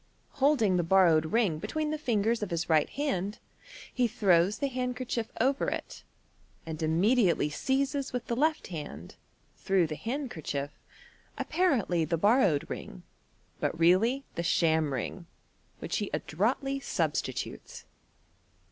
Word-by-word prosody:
Holding 255 -10 +3
the 175 - +1
borrowed 165 -3 +4
ring 195 -5 +1
between 310 - -2
the 310 - -1
fingers 230 -4 0
of 210 - -3
his 170 -1 -2
right 155 -2 +3
hand, 210 -8 -2 0.6
he 250 -2 +2
throws 195 -4 +3
the 280 - -1
handkerchief 250 -2 -3
over 265 +4 +1
it, - - -6 0.6
and 160 0 -6
immediately 175 0 +2
seizes 275 - -1
with 245 -1 -3
the 235 - -2
left 310 +5 +1
hand, 145 - -7 0.4
through 190 -3 +2
the 155 -1 -4
handkerchief, 175 - -4 0.7
apparently 235 - +1
the 165 +2 -1
borrowed 200 - +3
ring, - - -8 0.6
but - - -1
really 215 +11 +3
the - - -3
sham 160 -3 +2
ring, 165 - -4 0.5
which - - -3
he 205 -3 -2
«droitiy 245 - -1
substitutes. 475 - -3
205 Hz, 130 wpm, -29 LUFS, 165-260 Hz, 0.7 s, borrowed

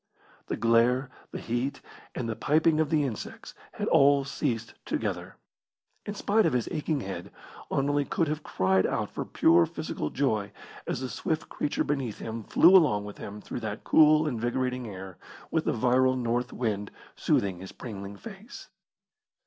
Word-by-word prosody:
The - - -2
glare, 120 +3 +3 0.2
the - - -6
heat, 120 +4 -2 0.4
and 120 - -3
the 110 - -2
piping 155 +6 +2
of 155 -2 +2
the 150 -2 +2
insects 125 -7 -6 0.2
had - - -3
all 140 0 +5
ceased 120 -5 -2
together. - - -3 0.7
In 205 - -4
spite 210 +2 +2
of - - 0
his 125 -3 0
aching 150 -2 -1
head, 95 -4 -6 0.4
Anerley 145 +1 +1
could 165 - 0
have 150 +1 -2
cried 95 -7 +1
out - - -2
for - - -4
pure 85 0 +4
physical 75 - -4
joy 110 -7 -1 0.3
as - - -2
the 130 - -3
swift 155 - -3
creature 145 - -1
beneath 135 -7 -2
him 115 0 -5
flew 170 - +6
along 105 - +4
with 105 - -9
him 105 +1 -7
through - - -6
that 110 -2 -5
cool, 155 0 +5
invigorating 125 0 -1
air, 95 -3 -9 0.3
with - - 0
the - - +2
virile 130 +2 +3
north 120 0 -1
wind 105 -4 -2 0.3
soothing 95 -3 +1
his 95 +1 -9
pringling 100 -3 -8
face. 215 0 -11
125 Hz, 165 wpm, -28 LUFS, 105-145 Hz, 0.7 s, flew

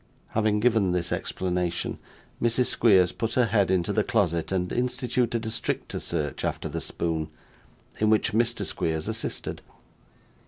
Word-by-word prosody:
Having 105 -1 +1
given 110 -6 +3
this 90 -1 -1
explanation, 90 -2 -2 0.4
Mrs. 120 +2 +3
Squeers 95 -8 +4
put 115 -1 -3
her 125 - +4
head 100 -3 +2
into 95 +2 +1
the 105 - +2
closet 90 -9 0
and 90 -1 0
instituted 125 -1 0
a 110 - -2
stricter 115 - -3
search 75 -5 -3
after - - -2
the - - -4
spoon, 80 -2 -2 0.7
in 110 - +3
which 110 +1 +3
Mr. 115 +1 +1
Squeers 80 -1 -2
assisted. - - -3
105 Hz, 145 wpm, -26 LUFS, 90-115 Hz, 0.7 s, Squeers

